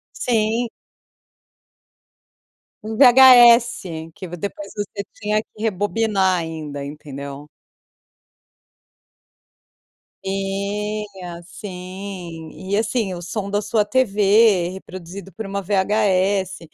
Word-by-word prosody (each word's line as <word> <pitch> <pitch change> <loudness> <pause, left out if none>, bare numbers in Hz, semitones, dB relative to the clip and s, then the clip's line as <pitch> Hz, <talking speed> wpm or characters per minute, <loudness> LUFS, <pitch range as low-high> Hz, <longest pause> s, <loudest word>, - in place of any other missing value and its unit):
Sim. 235 - 0 2.1
VHS 235 - +6
que 185 - -8
v 175 - -7
depois 200 +2 -6
você 205 -1 -4
tinha 210 0 -1
que 215 - -16
rebobinar 205 -2 +1
ainda, 155 -4 -6
entendeu. 140 0 -8 2.8
Tinha, 195 -1 -4
sim. 180 -3 -8 0.2
E 200 - +2
assim, 220 -2 -1
o 175 - -7
som 200 +3 -4
da 205 +1 +1
sua 215 0 +1
TV, 205 -4 +3
reproduzido 185 +1 -10
por 220 - -6
uma 200 0 -3
VHS. 195 -1 +1
200 Hz, 85 wpm, -21 LUFS, 180-215 Hz, 2.8 s, VHS